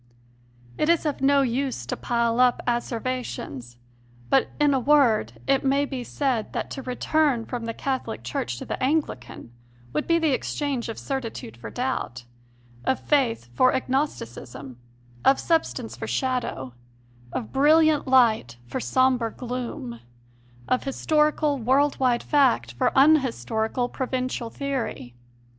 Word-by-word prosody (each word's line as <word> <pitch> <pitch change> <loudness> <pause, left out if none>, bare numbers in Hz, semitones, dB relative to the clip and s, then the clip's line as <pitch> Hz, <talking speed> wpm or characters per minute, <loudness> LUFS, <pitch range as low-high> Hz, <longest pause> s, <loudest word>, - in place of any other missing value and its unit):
It 305 - +2
is 335 -1 +3
of 295 -3 -2
no 275 0 +4
use 255 - -2
to - - -3
pile 235 0 0
up 250 -1 +4
asseverations, 240 - -3 0.5
but, 270 - +4
in 295 -1 +4
a 265 - +2
word, 245 - +3
it 275 - +2
may 275 +1 +2
be 265 -3 -5
said 250 -3 -1
that - - -3
to 270 - -5
return 260 -1 +1
from 240 -2 -5
the 230 - -3
Catholic 260 - -3
Church 120 0 -3
to - - -7
the - - -5
Anglican 260 - -2 0.4
would 150 - -1
be 335 - +4
the 320 -3 +2
exchange 270 -2 -2
of 225 - -5
certitude 235 - -5
for 120 - -8
doubt, 130 - -3 0.6
of 260 - +1
faith 240 - +1
for 255 - +4
agnos 265 +3 0
ticism, 125 +2 -9 0.5
of 270 - +5
substance 325 -1 0
for - - -6
shadow, 250 - -2 0.6
of 230 - -5
brilliant 305 +2 +4
light 225 - +3
for 120 - -4
sombre 245 - +2
gloom, 240 - -5 0.7
of 255 - +1
historical, 300 +1 +1
world 270 +5 +2
wide 250 -2 +2
fact 255 - +3
for 120 - +1
unhistorical, 250 -5 +2
provincial 255 -2 -3
theory. 265 - -4
255 Hz, 140 wpm, -25 LUFS, 225-275 Hz, 0.7 s, of